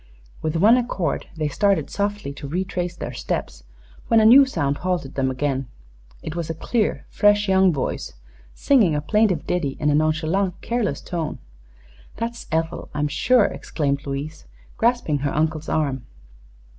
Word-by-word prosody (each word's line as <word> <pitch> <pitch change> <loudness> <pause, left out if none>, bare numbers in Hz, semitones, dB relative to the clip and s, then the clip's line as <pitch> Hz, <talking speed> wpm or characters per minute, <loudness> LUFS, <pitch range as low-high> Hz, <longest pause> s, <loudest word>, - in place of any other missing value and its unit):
With 155 +1 -2
one 215 +9 +6
accord 200 - -2
they 155 -1 0
started 195 0 +1
softly 205 -7 -2
to 140 - -8
retrace 180 +2 -3
their 125 -7 -6
steps 70 - -4 0.4
when 225 - +5
a 215 - +4
new 265 +5 +8
sound 145 - -1
halted 180 -7 -2
them 130 -1 0
again. 135 0 -2 0.6
It 155 - -5
was 170 -2 -3
a 165 - -3
clear, 215 +6 -1
fresh 205 0 +3
young 190 -1 +4
voice 135 - -3 0.4
singing 220 - +3
a - - +1
plaintive 210 -1 +1
ditty 150 -7 -1
in 150 0 +2
a - - +2
nonchalant, 160 +5 +1
careless 230 - -1
tone. 165 -4 -4 0.8
"That's 235 +1 -5
Ethel, 160 +1 -2
I'm 150 0 0
sure," 250 - +3
exclaimed 140 -2 -2
Louise, 145 +3 -5 0.3
grasping 230 - +1
her 140 0 -2
uncle's 155 0 -1
arm. 140 -5 -1
160 Hz, 155 wpm, -22 LUFS, 145-205 Hz, 0.8 s, new